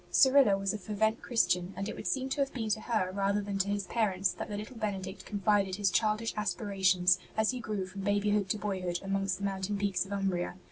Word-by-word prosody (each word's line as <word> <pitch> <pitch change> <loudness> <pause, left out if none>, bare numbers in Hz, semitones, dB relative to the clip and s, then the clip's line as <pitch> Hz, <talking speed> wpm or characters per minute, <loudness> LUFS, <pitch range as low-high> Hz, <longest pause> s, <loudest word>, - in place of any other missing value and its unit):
Cyrilla 265 -7 +6
was 195 0 -1
a 215 - -4
fervent 220 +3 0
Christian, 185 -6 +1
and 195 - -3
it - - -5
would - - -6
seem 265 -1 0
to 280 - -1
have 275 - 0
been 225 -3 -2
to 215 +1 0
her 215 -6 0
rather 200 +1 +1
than 200 -1 -3
to 195 - +1
his 200 -1 -1
parents 195 -4 +1
that - - -6
the 205 - -3
little 215 +5 -7
Benedict 195 -3 -4
confided 200 -2 +1
his 200 -1 +1
childish 215 +2 +1
aspirations 190 -4 +2 0.2
as 220 +1 +3
he 255 - -5
grew 210 -4 -3
from 195 +1 -8
babyhood 205 0 +1
to 215 - +1
boyhood 185 -4 -2
amongst 195 -1 -1
the 200 - -8
mountain 195 +1 -2
peaks 195 -3 0
of 195 - -11
Umbria. 190 -3 -1
200 Hz, 225 wpm, -31 LUFS, 190-215 Hz, 0.2 s, Cyrilla